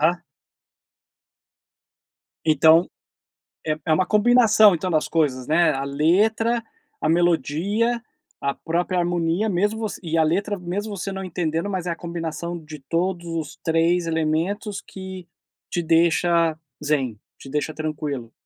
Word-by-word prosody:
Aham. 170 +3 +2 2.2
Então, 160 +2 +5 0.8
é 155 0 0
é 160 - +3
uma 185 +3 +2
combinação, 220 -1 +5
então, 185 +3 -3
das 155 -2 +1
coisas, 135 -6 0
né. 160 +1 +4
A 135 0 -2
letra, 210 +11 +2 0.4
a 155 - +1
melodia, 175 - +1 0.4
a 140 0 0
própria 175 +2 -1
harmonia, 175 +4 0
mesmo 205 +4 0
você 220 -2 -4
e 165 0 -1
a 160 - +5
letra, 200 +6 0
mesmo 200 +4 -4
você 195 +1 -4
não 190 0 -5
entendendo, 170 0 -2
mas 185 -3 -3
é - - 0
a 170 - -2
combinação 170 0 -5
de 155 0 -10
todos 175 +1 -1
os 165 -3 -4
3 165 +1 +2
elementos 165 +6 -1
que 190 -2 -9 0.4
te 175 - -1
deixa 165 0 +3 0.3
zen, 135 -7 0 0.2
te 135 - -12
deixa 150 +2 -2
tranquilo? 145 -6 -4
170 Hz, 135 wpm, -23 LUFS, 155-190 Hz, 2.2 s, Então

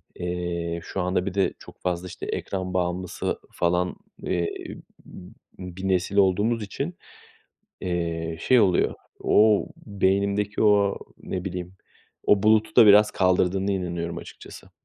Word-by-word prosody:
eee 85 -1 -3
şu 95 - -4
anda 90 0 0
bir 100 - -3
de 100 0 +1
çok - - -15
fazla, 90 0 -2
işte, - - -8
ekran 95 -1 -4
bağımlısı 90 0 -2
falan, 90 +1 0 0.3
eee, 85 -2 0 0.6
b 90 -1 -12 0.3
bir 90 +1 -6
nesil 95 +1 0
olduğumuz 105 +4 +2
için, 140 - -5 0.8
eee, 85 -2 -2
şey 125 -2 +4
oluyor; 95 -4 +2 0.3
o, 105 -1 +4 0.2
beynimdeki 100 0 0
o, 100 -2 +3 0.2
ne 90 -1 -5
bileyim, 90 -1 -5 0.5
o 105 -1 +4
bulutu 110 0 +3
da 110 - +9
biraz 105 +1 +7
kaldırdığına 95 +1 +1
inanıyorum 85 -3 -3
açıkçası. - - -12
95 Hz, 130 wpm, -25 LUFS, 90-100 Hz, 0.8 s, da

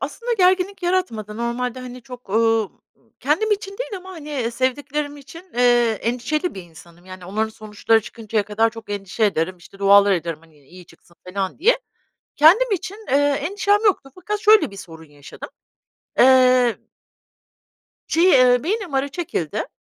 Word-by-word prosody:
aslında 480 0 -4
gerginlik 375 -1 +1
yaratmadı. 230 - -2
Normalde, 240 +2 -3
hani, 250 -1 -9
çok, 250 -5 -12
ııı, 225 -1 +2 0.5
kendim 320 +11 0
için 395 0 -4
değil - - -5
ama, 375 +1 -11
hani, 290 -8 -4
sevdiklerim 285 +4 -2
için, 335 +6 -14
eee, 240 -3 +3
endişeli 250 - -2
bir 190 - -8
insanım 170 +1 -17
yani 185 -1 -11
onların 215 +4 -2
sonuçları 215 +1 0
çıkıncaya 220 -1 -3
kadar 220 +2 +1
çok 225 -2 -12
endişe 200 +2 -2
ederim, 185 -2 0
işte, 180 +3 -17
dualar 200 0 +5
ederim, 170 -3 -2
hani, 160 -2 -23
iyi 180 0 -15
çıksın 170 +1 -22
falan 190 +3 -4
diye. 480 +8 +3 0.6
Kendim 400 +11 +5
için, 390 +2 -3
eee, - - 0
endişem 370 +9 +1
yoktu 330 -9 +1
fakat 415 +3 -4
şöyle 425 - +5
bir 200 - -12
sorun 165 -4 -11
yaşadım. 145 -1 -12 0.7
Eee 255 -2 +5 1.3
Şey, 335 +2 +2
eee, 250 -1 +5
beyin 395 0 -2
MR'ı 270 +1 -1
çekildi. 275 - -4
245 Hz, 150 wpm, -21 LUFS, 205-335 Hz, 1.3 s, dualar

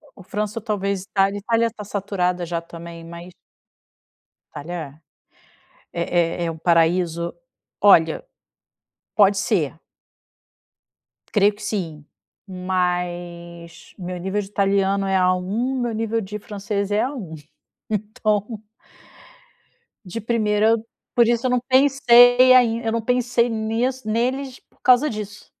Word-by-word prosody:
O 195 - -14
França 210 +4 -3
ou - - -17
talvez 200 -3 -2
a - - -44
Itália. 195 0 +2
Itália 230 +2 +1
tá 215 -1 -9
saturada 190 -3 -2
já 170 0 -3
também 170 0 -10
mas 170 +1 -10 1.2
Itália 165 +3 -6 1.1
é 170 - -1 0.2
é 170 +1 -2
é 165 - -1
o 160 - -9
paraíso, 170 0 +1 0.5
olha - - +5 0.9
pode 200 -1 +5
ser 165 -7 -1 1.5
creio 205 0 +3
que 210 - -15
sim, 165 -8 -4 0.4
mas 175 -2 -4
meu 180 -1 -5
nível 190 +3 -2
de 195 - -8
italiano 195 -1 +1
é 195 0 0
A1, 190 +8 0
meu 240 -2 -2
nível 225 +1 -1
de 210 +1 -6
francês 200 0 -4
é 210 +1 +2
A1. 240 - -5 0.5
Então 215 0 -2 1.4
de 190 +5 -5
primeira 215 -1 +1
eu 225 -1 0 0.3
por 235 -1 +5
isso 235 +1 +1
eu 255 - +2
não 250 - +2
pensei 255 -2 +6
ainda, 230 -2 +3
eu - - +1
não 230 - 0
pensei 245 0 +1
neles 245 +3 -2
por - - -35
causa 255 +4 +5
disso. 210 -4 -6
205 Hz, 125 wpm, -22 LUFS, 180-230 Hz, 1.5 s, pensei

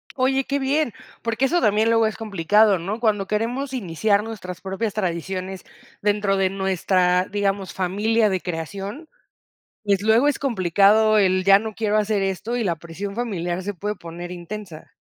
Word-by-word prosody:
Oye, 265 0 +1
qué 280 0 -1
bien, 275 -2 0 0.3
porque 230 +3 0
eso 345 +6 +2
también 215 +2 +3
luego 225 -1 +4
es 215 - -4
complicado, 210 0 +3
¿no? 200 +7 -4
Cuando 210 -4 +1
queremos 245 +6 -2
iniciar 200 -1 +1
nuestras 190 -6 -7
propias 195 +3 -3
tradiciones 185 0 -3 0.4
dentro 205 -1 +1
de 190 -1 +2
nuestra, 185 -1 +1
digamos, 200 -1 -2
familia 210 +4 +1
de 190 -1 0
creación, 195 - -6 0.8
pues, 200 -1 +1
luego 225 +6 +4
es 290 - 0
complicado 215 -2 +3
el 185 -2 +2
ya 195 0 +7
no 220 0 -6
quiero 215 -1 0
hacer 210 -1 +1
esto, 195 +5 -2
y 240 - -1
la 170 -4 0
presión 170 +5 -7
familiar 185 -6 -3
se 205 +2 -3
puede 210 +4 -3
poner 170 +1 -8
intensa. 180 -1 -8
205 Hz, 165 wpm, -22 LUFS, 185-220 Hz, 0.8 s, ya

